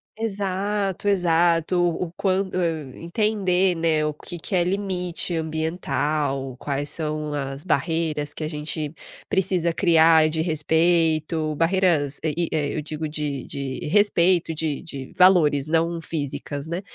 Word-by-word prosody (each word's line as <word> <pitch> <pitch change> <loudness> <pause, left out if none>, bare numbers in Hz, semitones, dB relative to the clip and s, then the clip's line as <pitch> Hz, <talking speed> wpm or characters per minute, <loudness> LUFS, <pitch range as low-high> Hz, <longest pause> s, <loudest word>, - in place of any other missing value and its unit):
Exato, 200 -2 -2
exato. 170 -3 +2
O 175 0 +1
o - - -13
quan 190 0 +1
hum, 165 -7 -2
entender, 185 0 +1
né, 160 -2 +1
o 150 - -1
que 175 +4 -9
que 180 +4 -3
é 175 - +3
limite 180 -2 -2
ambiental, 155 -4 -1
quais 140 +2 -2
são 155 -1 -2
as 135 0 -4
barreiras 160 -4 -1
que - - -6
a - - -1
gente 150 0 -4 0.4
precisa 180 -3 +1
criar 165 -3 +5
de 160 0 -1
respeito, 160 -1 +1
barreiras, 165 -4 +1
eh, 155 -2 0
e 170 -1 -1
eh, 150 -3 -1
eu 155 - -1
digo 155 +1 -5
de 150 -3 -4
de 135 -1 -5
respeito, 175 -2 +3
de 155 -2 -2
de 135 -4 -8
valores, 160 -6 +5
não 165 +1 0
físicas, 145 -2 -4
né. 170 +3 -3
165 Hz, 140 wpm, -23 LUFS, 150-180 Hz, 0.4 s, criar